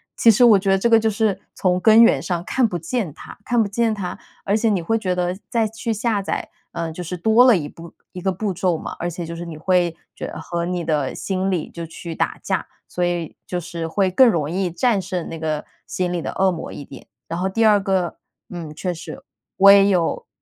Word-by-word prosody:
其 230 - +5
实 225 +2 +5
我 215 -4 +7
觉 195 +1 -1
得 195 - +4
这 195 - +1
个 230 -1 +6
就 220 0 +1
是 215 -3 0 0.2
从 180 -1 +1
根 220 +5 +7
源 135 - +4
上 170 +1 -2
看 255 -3 +2
不 180 - -3
见 175 +2 -3
它， - - -12
看 240 +2 0
不 - - -2
见 225 +2 0
它， 185 -3 -5 0.3
而 200 - +2
且 225 +1 +2
你 200 -3 +1
会 225 +7 0
觉 185 -4 -1
得 180 0 -1
再 230 -3 +1
去 225 +2 -4
下 220 -1 0
载， 195 - -4 0.2
呃， 165 -1 -3
就 180 +3 -6
是 180 +2 -5
多 220 +7 +5
了 245 -6 +6
1 150 -4 -4
步 165 +3 -12 0.2
1 180 - -8
个 190 - 0
步 195 +2 -2
骤 175 -1 0
嘛， - - -7
而 175 - -2
且 175 0 -6
就 170 +1 -6
是 170 - -6
你 165 -2 -8
会 175 0 +1 0.2
觉 - - -5
得 - - -7
和 170 0 -3
你 180 -1 -2
的 150 -5 -1
心 190 0 -2
里 180 -5 -2
就 170 - -7
去 165 +1 -8
打 - - -1
架， - - -2 0.2
所 180 - -3
以 175 -2 -2
就 180 - -2
是 170 -1 -5
会 190 +3 +1
更 255 +6 +6
容 155 -7 -1
易 185 +1 -1
战 205 +4 +1
胜 180 -2 -4
那 165 - -7
个 155 -1 -2 0.2
心 180 -1 -2
里 175 - -2
的 - - -4
恶 190 0 +3
魔 170 - -6
一 145 - -8
点。 135 - -13 0.2
然 165 +1 -4
后 190 +1 0
第 225 +4 +1
二 210 -2 +6
个， 190 -3 -1 0.3
嗯， 165 -4 -7
确 180 +3 -3
实， 165 - -9 0.3
我 195 +1 +8
也 200 0 +7
有 185 - 0
185 Hz, 260 characters per minute, -21 LUFS, 170-210 Hz, 0.3 s, 我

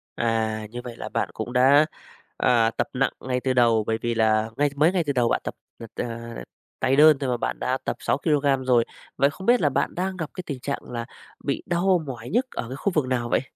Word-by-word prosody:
À, 110 -2 -1
như 120 0 -6
vậy 120 -2 -7
là - - -6
bạn - - -1
cũng 120 - -5
đã, 140 +4 +6 0.5
ờ, 115 -3 +3
tập - - +1
nặng 135 +1 +1
ngay 125 -1 -2
từ 130 0 0
đầu, 115 -3 +4
bởi 110 0 +1
vì 120 -1 -1
là 110 0 +2
ngay 145 0 +3
mới 155 +5 +4
ngay 180 -3 +1
từ 140 - +1
đầu 120 -2 +2
bạn - - +1
tập - - -5 0.2
tập, 115 -2 -9
à, 115 0 -5 0.4
tay 135 - +2
đơn 150 0 +7
thôi 135 -2 -2
mà 120 - 0
bạn - - -3
đã 130 +1 0
tập - - -1
6 - - 0
kilôgam 140 -4 +1
rồi. 120 -2 +4 0.3
Vậy 140 - +4
không 190 +7 -9
biết 245 -3 +5
là 145 - +3
bạn - - -1
đang 185 +1 -2
gặp 160 -3 -4
cái 185 - -6
tình 140 -4 -5
trạng 140 +2 -3
là 120 -1 -5 0.4
bị 140 - -2
đau 175 0 +2
mỏi 120 -3 -7
nhức 245 +4 +2
ở 115 - -4
cái 130 - -5
khu 200 +7 -1
vực 150 -4 +2
nào 120 -2 -1
vậy? - - +2
130 Hz, 250 wpm, -24 LUFS, 115-150 Hz, 0.5 s, đơn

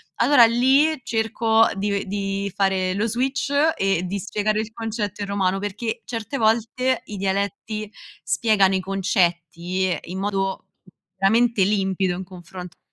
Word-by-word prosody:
allora 245 0 +6
lì 265 +6 +3
cerco 225 0 +2
di 200 0 -1
di 195 0 -3
fare 190 -2 +1
lo 210 +4 0
switch 260 +5 -1 0.2
e 195 -2 0
di 195 +3 -3
spiegare 215 +3 -1
il 220 +1 -7
concetto 220 -3 -4
in - - -5
romano, 195 -1 0
perché 220 +3 -4
certe 230 +4 -4
volte 235 +3 +1
i 205 - -7
dialetti 200 +2 -3 0.3
spiegano 205 -4 +2
i - - +1
concetti 185 -1 0
in 185 +2 -6
modo 195 -1 -2 0.5
veramente 225 +2 +3
limpido 190 -2 0
in 185 - -5
confronto 180 -2 -13
all'italiano 180 0 -10
200 Hz, 140 wpm, -22 LUFS, 190-225 Hz, 0.5 s, allora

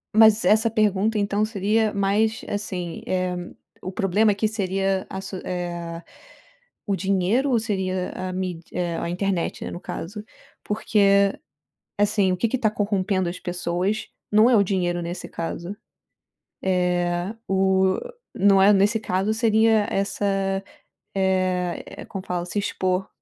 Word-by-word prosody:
Mas 220 0 +7
essa 220 +2 +4
pergunta 215 0 +2
então 205 +1 +1
seria 215 +1 +1
mais, 205 +3 +1
assim, 185 -5 -4
eh, 185 -1 -1 0.5
o 185 - -5
problema 200 +3 +2
aqui 205 +2 0
seria 195 -2 -1
a 190 - -5
su 190 - -6
eh, 175 -2 -4 0.9
o 200 - +1
dinheiro 195 +8 +1
ou 240 - +3
seria 190 -4 -2
a 185 0 -4
míd 180 -2 -4
eh, 175 -2 -2
a - - -3
internet, 185 0 -1
né, - - -4
no - - -6
caso? 205 +4 -6 0.4
Porque, 200 -2 +3 0.7
assim, 205 -2 +3
o - - 0
que 230 +6 0
que 260 - 0
tá 220 -4 +2
corrompendo 200 -3 0
as 175 - -5
pessoas 180 +4 -2 0.2
não 215 +3 +6
é 245 - +5
o 205 - +5
dinheiro 175 -2 -1
nesse 175 +1 -5
caso, 170 +3 -5 0.9
é 180 0 0
o 190 0 +2 0.4
não 195 0 +5
é 200 +2 +7
nesse 205 +3 +3
caso, 195 +1 0
seria 220 -1 +3
essa, 200 +1 -1 0.9
eh 185 -2 0
eh - - -9
como 195 -2 -7
fala? 175 -1 -2
Se 180 +4 -3
expor 185 -2 -1
195 Hz, 145 wpm, -24 LUFS, 180-210 Hz, 0.9 s, Mas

